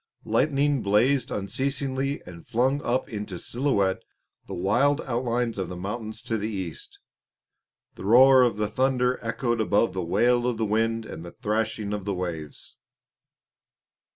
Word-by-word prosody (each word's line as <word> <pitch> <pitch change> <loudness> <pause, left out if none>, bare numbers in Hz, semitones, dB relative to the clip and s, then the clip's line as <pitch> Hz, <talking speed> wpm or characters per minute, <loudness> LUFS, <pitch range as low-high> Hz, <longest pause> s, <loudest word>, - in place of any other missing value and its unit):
Lightning 140 -1 +2
blazed 115 +7 +2
unceasingly 135 +5 -2
and 85 -2 -12
flung 130 +5 +1
up 125 0 0
into 105 -4 -5
silhouette 100 -6 0 0.5
the - - -5
wild 120 +11 +2
outlines 120 -2 -1
of 95 -3 -3
the 90 - -6
mountains 110 +4 -5
to 115 -2 -2
the 105 +2 -2
east. 95 -6 -6 1.0
The - - -9
roar 130 +4 +7
of 120 -4 +3
the 105 0 -1
thunder 130 0 +1
echoed 115 0 -1
above 105 +1 +2
the 95 - -2
wail 120 +8 +2
of 120 -2 -1
the 110 - 0
wind 115 +1 0
and 80 - -8
the 85 - -10
threshing 110 -1 -2
of 105 -2 -4
the 100 -2 -1
waves. 85 -5 -6
115 Hz, 150 wpm, -26 LUFS, 100-130 Hz, 1.0 s, roar